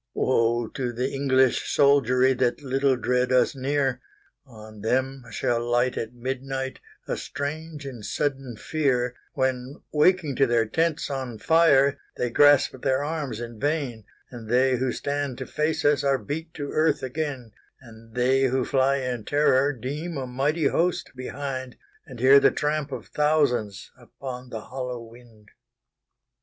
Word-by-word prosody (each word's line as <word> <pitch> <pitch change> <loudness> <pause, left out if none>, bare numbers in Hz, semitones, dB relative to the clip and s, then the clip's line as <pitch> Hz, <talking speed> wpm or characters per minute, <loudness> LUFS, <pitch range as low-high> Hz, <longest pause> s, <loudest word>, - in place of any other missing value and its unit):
Woe 120 -2 +1
to 130 -4 -3
the 125 +3 -2
English 130 -2 +2
soldieryThat 130 -1 +3
little 135 0 +1
dread 125 0 0
us 130 +2 +3
near! 135 -1 0 0.5
On 110 -3 -12
them 130 +4 -1
shall 120 -1 -1
light 120 +1 +1
at 115 +2 -5
midnightA 130 +1 -5
strange 150 +2 -5
and 125 -5 -8
sudden 135 -2 -3
fear:When, 130 -1 -1 0.2
waking 155 -2 +2
to 135 - +4
their 115 -1 +2
tents 160 +6 -1
on 130 -4 -4
fire, 140 0 +4 0.2
They 125 -1 -1
grasp 145 -1 +4
their 130 +1 +1
arms 145 -7 -3
in 120 -2 -7
vain, 140 -7 -2 0.3
And 115 -3 -9
they 130 +1 +3
who 130 0 0
stand 140 -2 -3
to 130 - -5
face 155 +3 -1
usAre 140 -2 +2
beat 160 +3 -4
to 145 -2 -5
earth 155 -3 +1
again; 130 -3 -4 0.3
And 115 -2 -16
they 130 +2 +3
who 130 -1 +1
fly 135 0 +2
in 125 -4 -3
terror 145 +1 +3
deemA 145 +3 -5
mighty 140 +5 0
host 175 +5 +1
behind, 130 -1 -5 0.3
And 125 -5 -10
hear 135 +3 +7
the - - +5
tramp 150 -1 -2
of - - -8
thousandsUpon 125 -3 -1
the 110 -3 -6
hollow 125 0 -6
wind. 115 -2 -17
130 Hz, 140 wpm, -25 LUFS, 125-145 Hz, 0.5 s, hear